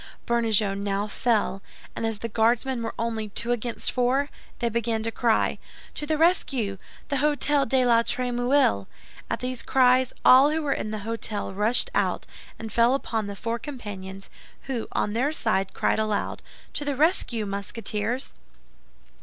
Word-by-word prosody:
Bernajoux 220 -4 +2
now 200 +1 -2
fell, 210 -3 0 0.3
and 225 - -1
as 225 -1 -2
the 230 - -4
Guardsmen 235 +3 +1
were 225 - -4
only 225 -2 -2
two 235 +4 -1
against 240 0 -1
four, 260 +3 +1 0.3
they 235 - 0
began 230 -1 -1
to 230 - -1
cry, 230 -1 +1 0.3
"To 295 - -5
the 310 0 +1
rescue! 265 - +1 0.3
The 280 - 0
Hôtel 290 -1 +2
de 260 0 +3
la 230 -1 +5
Trémouille!" 245 - +1 0.4
At - - -2
these 250 -1 -3
cries, 255 -1 +3
all 265 +3 +8
who 315 +1 -1
were 280 -2 +1
in 215 - -4
the 215 -1 -4
hôtel 225 -3 -3
rushed 225 - +2
out - - 0 0.3
and 225 -1 -7
fell 235 +3 +4
upon 225 -6 -2
the 200 - -5
four 230 +3 -3
companions, 200 -8 -8 0.4
who 250 -4 -3
on 205 - -1
their 260 +6 +1
side 205 -10 0
cried - - +1
aloud, 215 -1 -1 0.3
"To - - -2
the 285 -1 -1
rescue, 260 - +1
Musketeers!" 210 +4 -3
230 Hz, 160 wpm, -25 LUFS, 215-260 Hz, 0.4 s, all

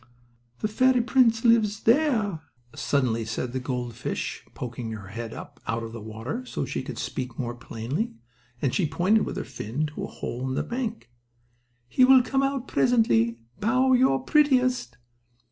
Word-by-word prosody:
"The - - +1
fairy 255 +3 +3
prince 235 -2 +3
lives 220 -3 +4
in 230 - +9
there," 225 - 0 0.3
suddenly 125 -5 0
said 110 +3 -3
the 130 - -1
gold 125 -2 -3
fish, 115 - -4
poking 120 -2 -5
her 100 -3 -8
head 115 +2 -6
up - - -10
out 115 0 -1
of 115 - -6
the 115 - -7
water, 110 - -5
so 255 - -3
she - - -3
could - - -7
speak 125 -3 -4
more 120 -2 -3
plainly, 120 - -4 0.5
and 135 - +1
she 180 - +2
pointed 195 +7 +2
with - - -4
her - - -2
fin 125 +9 -3
to - - -4
a - - -6
hole 125 +2 -5
in 130 - -2
the - - 0
bank. 230 - -4 0.8
"He 255 - +3
will 260 0 +8
come 270 +2 +1
out 275 -2 -1
presently. 115 - +3 0.2
Bow 255 +4 +3
your 255 0 +3
prettiest." 255 - +2
175 Hz, 175 wpm, -26 LUFS, -, 0.8 s, in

